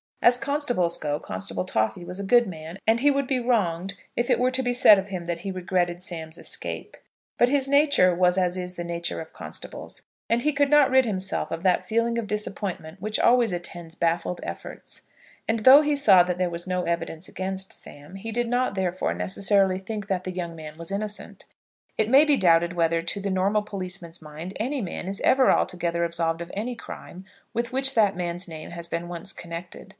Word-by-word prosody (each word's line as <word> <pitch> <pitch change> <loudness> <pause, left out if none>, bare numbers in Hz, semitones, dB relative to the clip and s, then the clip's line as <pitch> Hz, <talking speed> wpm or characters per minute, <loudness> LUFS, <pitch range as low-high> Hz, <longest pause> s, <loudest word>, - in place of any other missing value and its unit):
As 245 +1 +7
constables 270 - 0
go, 150 -1 -2
Constable 95 0 -4
Toffy 110 +8 -1
was 180 +2 -7
a - - -3
good 240 +4 +5
man, 165 -2 -8
and 225 +1 +3
he 290 +4 +4
would 280 -1 +1
be 255 -1 0
wronged 195 -6 0 0.2
if 240 - -1
it - - +4
were 250 +1 +2
to 260 0 0
be 245 -1 0
said 215 -5 +7
of 195 - -5
him 185 -3 -5
that 170 -1 -3
he 195 +3 -4
regretted 180 -1 -1
Sam's 165 -3 -7
escape; - - -6 0.4
but 240 - +5
his 275 -1 +2
nature 280 -10 +4
was 180 +1 +3
as 180 -1 +1
is 180 0 -5
the 175 - -4
nature 170 0 -3
of 160 - -9
constables, - - -9 0.3
and 235 +1 +2
he 300 - +2
could 285 0 +2
not 295 -2 +5
rid 260 -1 +5
himself 190 -4 -1
of 165 - -4
that 185 -2 +2
feeling 230 +1 0
of 220 - -4
disappointment 200 -5 -4
which 215 +1 -2
always 240 -3 +4
attends 175 -1 -7
baffled 170 +1 0
efforts. - - -8 0.5
And 225 0 +1
though 260 +6 +9
he 295 -1 +1
saw 200 -10 +6
that 180 0 -2
there 180 -1 0
was 170 +2 -3
no 180 -1 -1
evidence 170 0 -3
against 190 0 -5
Sam, 145 +6 -11
he 225 +4 -6
did 240 +1 -1
not, 245 -2 0
therefore, 185 -1 -1
necessarily 195 -1 +2
think 210 +1 -6
that 190 -3 -1
the 185 - -4
young 175 -2 -5
man 155 -1 -9
was 170 +2 -7
innocent. 210 +1 -5 0.5
It 220 0 +2
may 275 +4 +7
be 295 -2 +3
doubted 170 -2 +4
whether, 165 -1 +1
to 175 +4 -3
the 200 0 -2
normal 195 +3 +1
policeman's 185 -5 -7
mind, 155 +4 -8
any 260 +5 -1
man 185 -2 -5
is 195 +1 -4
ever 260 0 +5
altogether 170 -1 0
absolved 165 -1 -1
of 170 - -7
any 235 +5 -3
crime 185 -4 -10 0.3
with 235 +2 -1
which 270 +1 +2
that 210 -4 +4
man's 175 +1 -3
name 160 -2 -8
has 170 0 -5
been 170 0 -4
once 175 +2 -2
connected. 170 +1 -8
185 Hz, 210 wpm, -25 LUFS, 170-230 Hz, 0.5 s, though